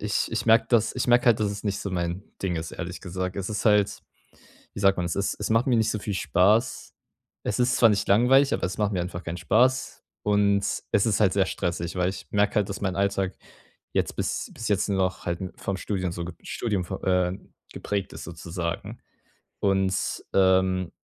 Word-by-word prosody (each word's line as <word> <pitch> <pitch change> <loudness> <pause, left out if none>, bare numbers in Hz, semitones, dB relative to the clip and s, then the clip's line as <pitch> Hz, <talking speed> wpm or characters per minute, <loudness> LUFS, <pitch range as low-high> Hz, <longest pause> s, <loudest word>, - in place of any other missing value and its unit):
ich 105 -1 0
ich 120 +1 -1
merke 115 +1 +5
dass 115 -3 +3
ich 125 - -1
merke 120 +1 +4
halt, 120 -2 +5
dass 105 -1 +1
es 105 - -7
nicht 100 -1 -1
so 100 - -4
mein 85 0 -2 0.2
Ding 90 -3 -1
ist, 80 0 -5
ehrlich 90 0 -6
gesagt. 90 0 -4
Es 95 -1 -3
ist 105 - -3
halt, 105 -2 +3 0.7
wie - - -7
sagt 95 -1 +4
man 90 - -1
es 85 - -2
ist 100 - 0
es 105 - -2
macht 115 +3 +3
mir 125 - +3
nicht 110 -1 +2
so 110 - -2
viel 100 +1 -4
Spaß. 105 +7 +2 0.5
Es 105 - -2
ist 125 0 +3
zwar 115 - +6
nicht 105 -2 0
langweilig, 130 +7 +5
aber - - -2
es 90 - -4
macht 105 -1 +1
mir 90 - 0
einfach 90 0 -5
keinen 85 - -4
Spaß. 125 +7 +2 0.3
Und 105 -1 +3 0.3
es 100 - +4
ist 105 - +1
halt 95 -3 +4
sehr 100 -1 +3
stressig, 85 -1 -3
weil 90 0 +2
ich 95 - -8
merke 105 0 +2
halt, 105 -1 +1
dass 100 - -4
mein 95 -2 -1
Alltag 100 -1 0 0.6
jetzt - - 0
bis - - -2
bis 115 - -5
jetzt 100 -2 +1
nur 100 - +1
noch 95 0 -1
halt 85 -1 -2 0.2
vom 100 - -2
Studium 95 -3 -2
so 85 -1 -4 0.2
Studium 100 -6 -2
vo 95 - -2
äh, 90 -1 +2 0.4
geprägt 100 -2 -3
ist - - -8
sozusagen. 85 0 -5 0.6
Und, 95 -1 +2 0.4
ähm, 95 -2 +3
100 Hz, 210 wpm, -26 LUFS, 90-105 Hz, 0.7 s, zwar